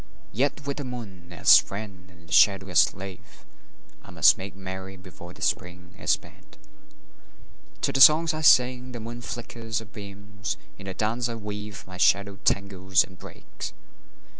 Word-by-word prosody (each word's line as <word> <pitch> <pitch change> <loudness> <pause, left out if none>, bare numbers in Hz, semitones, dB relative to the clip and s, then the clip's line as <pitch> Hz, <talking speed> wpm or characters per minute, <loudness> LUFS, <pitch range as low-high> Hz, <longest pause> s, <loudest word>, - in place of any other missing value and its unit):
Yet 140 +4 -1
with 140 0 -3
the 145 - -4
moon 100 -9 -9
as 85 - +7
friend 100 -3 -8
and 85 -2 -19
the - - -18
shadow 95 -2 +4
as 90 - +4
slave 95 -2 -2 0.6
I - - -15
must - - +5
make 95 0 -8
merry 95 0 -8
before 90 -2 -12
the 95 +1 -10
Spring 90 -2 -3
is - - -5
spent. - - -3 1.2
To - - 0
the 135 - +1
songs 160 +3 +7
I 155 - -4
sing 125 -3 +4
the 120 - -6
moon 120 +2 -8
flickers 115 -1 -6
her 110 - -4
beams; 105 -1 -7 0.2
In 95 - -10
the 95 - -5
dance 115 +4 -1
I 115 - -4
weave 105 -1 -7
my 90 -1 -11
shadow 100 +1 +2
tangles 95 -1 +1
and 95 -1 -16
breaks. - - -9
100 Hz, 165 wpm, -25 LUFS, 95-115 Hz, 1.2 s, as